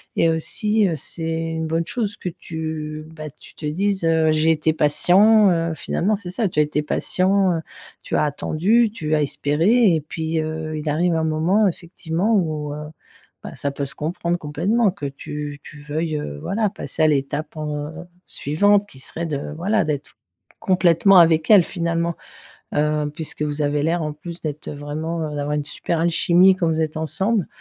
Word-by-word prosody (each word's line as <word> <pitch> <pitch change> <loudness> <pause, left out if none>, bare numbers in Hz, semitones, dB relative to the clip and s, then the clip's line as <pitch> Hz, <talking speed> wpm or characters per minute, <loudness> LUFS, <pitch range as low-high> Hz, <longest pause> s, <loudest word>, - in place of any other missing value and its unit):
et 165 - +3
aussi, 210 +6 +1
heu, 175 - -1
c'est 165 +2 -3 0.2
une 160 0 -3
bonne 165 +1 -1
chose 210 +1 -2
que 180 - -5
tu 160 -2 -6
bah, 155 -1 -7
tu - - -16
te 155 - -8
dises, 190 +4 0
heu: 160 -1 +3
«j'ai 155 +1 +3
été 160 0 +1
patient», 190 +8 +5
heu, 165 -1 0
finalement, 205 +6 0
c'est 195 -3 -5
ça. 200 +4 0
Tu 170 - -2
as - - +6
été 150 0 -2
patient, 190 +4 +1
heu, - - -4 0.4
tu - - -3
as - - +3
attendu, 190 +10 +1
tu 155 -8 -3
as 150 - +2
espéré 165 - +3
et - - +1
puis, 160 +2 -3
heu, 155 0 -3
il 155 +1 -6
arrive 165 +3 +1
un 160 0 0
moment, 170 +7 +2
effectivement, 175 +3 -2
où, 155 -6 -1
heu, - - -6 0.7
bah, - - -8
ça 140 - -2
peut 140 0 -4
se 140 +2 -8
comprendre 170 +2 -2
complètement 185 +9 +1
que 180 -6 -8
tu 145 +1 -6
tu 150 - -12
veuilles, 155 +2 -3
heu, 75 - -5
voilà, 215 +1 0
passer 200 - -5
à - - +6
l'étape 150 +1 -1
en, 150 -1 -3
heu, - - -10 0.3
suivante, 205 +8 +2
qui 135 - -15
serait 165 +5 -4
de, 150 -1 -4
voilà, 200 +5 +1
d'être 145 -2 -4 0.4
complètement 185 +1 +4
avec 160 -2 +4
elle, 200 -4 +8
finalement, 170 -1 -1 0.6
heu, 150 0 +1
puisque 155 -1 -5
vous 150 0 -2
avez 145 0 0
l'air 165 +1 0
en 150 -1 -3
plus 170 +3 -9
d'être, 155 -1 -5
heu, - - -6
vraiment, 155 +3 -4
heu, - - -6
d'avoir 145 0 -2
une 150 -1 -2
super 165 +2 -3
alchimie 175 +3 +4
quand 175 -2 0
vous 160 0 0
êtes 155 -1 -2
ensemble, 190 +5 0
160 Hz, 190 wpm, -21 LUFS, 150-180 Hz, 0.7 s, elle